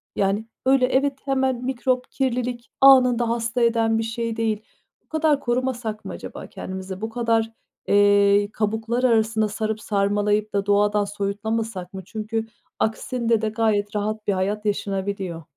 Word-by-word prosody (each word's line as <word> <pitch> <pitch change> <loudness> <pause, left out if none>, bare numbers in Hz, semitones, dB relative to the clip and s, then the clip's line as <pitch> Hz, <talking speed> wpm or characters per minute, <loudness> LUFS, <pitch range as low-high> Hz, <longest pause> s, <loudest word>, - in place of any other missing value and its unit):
Yani 200 +2 0 0.2
öyle 265 -1 +4
evet, 270 +2 +1
hemen 265 -2 0
mikrop, 255 0 -1
kirlilik, 245 -2 -2
anında 250 -3 +6
hasta 230 +1 -1
eden 225 -1 +3
bir 225 - 0
şey 225 0 -3
değil. 220 -2 0 0.4
Bu - - -44
kadar 315 -2 +2
korumasak 240 -4 -2
mı - - -5
acaba - - -8
kendimizi? 190 0 -7
Bu 220 - -2
kadar, 225 -1 0 0.4
eee, 205 0 +4
kabuklar 220 +3 -1
arasına 220 -3 +3
sarıp 215 +1 -3
sarmalayıp 205 +1 0
da 200 -1 0
doğadan 205 0 +3
soyutlamasak 205 -1 -3
mı? 190 - -6
Çünkü 220 +2 -3 0.3
aksinde 230 +1 0
de 220 - 0
gayet 210 -2 0
rahat 215 +1 -2
bir 200 - +3
hayat 205 +3 -1
yaşanabiliyor. 195 -4 -2
220 Hz, 145 wpm, -23 LUFS, 205-240 Hz, 0.4 s, anında